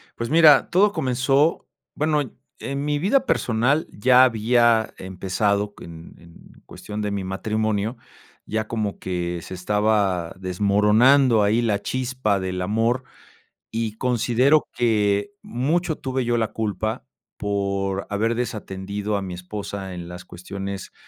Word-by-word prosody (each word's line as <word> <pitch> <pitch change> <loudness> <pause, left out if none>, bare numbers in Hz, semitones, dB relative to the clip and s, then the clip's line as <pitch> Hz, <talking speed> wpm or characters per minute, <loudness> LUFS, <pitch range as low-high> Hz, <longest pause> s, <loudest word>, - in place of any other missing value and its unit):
Pues, 115 +3 -4
mira, 155 -4 +7
todo 200 +3 +4
comenzó 135 +4 +1 0.3
bueno, 150 -1 +1
y 125 - -10 0.3
en 140 +1 -4
mi 145 0 0
vida 245 - +1
personal 125 +7 +1
ya 125 +4 +5
había 115 -1 +3
empezado 100 +2 -1
en 85 0 -14
cuestión 105 0 -7
de 105 - -2
mi 100 -1 -3
matrimonio, 110 +3 -1 0.5
ya 110 0 -2
como 105 -3 -3
que 90 -2 -3
se - - -8
estaba 100 -2 0
desmoronando 105 +6 +4
ahí 110 +4 +2
la 105 -3 +1
chispa 125 -6 -1
del 90 -1 -3
amor. 115 +5 0 0.7
Y 110 -1 -3
considero 125 +4 +2
que 105 - +1
mucho 165 - -1
tuve 130 -1 -2
yo 120 0 0
la 110 -1 -1
culpa 110 +1 -2 0.3
por 100 -1 -2
haber 110 +3 0
desatendido 105 -3 -3
a - - -3
mi 95 -2 -5
esposa 95 +1 -6
en 85 -1 -7
las 90 +1 -9
cuestiones 95 +2 -7
110 Hz, 130 wpm, -23 LUFS, 100-125 Hz, 0.7 s, mira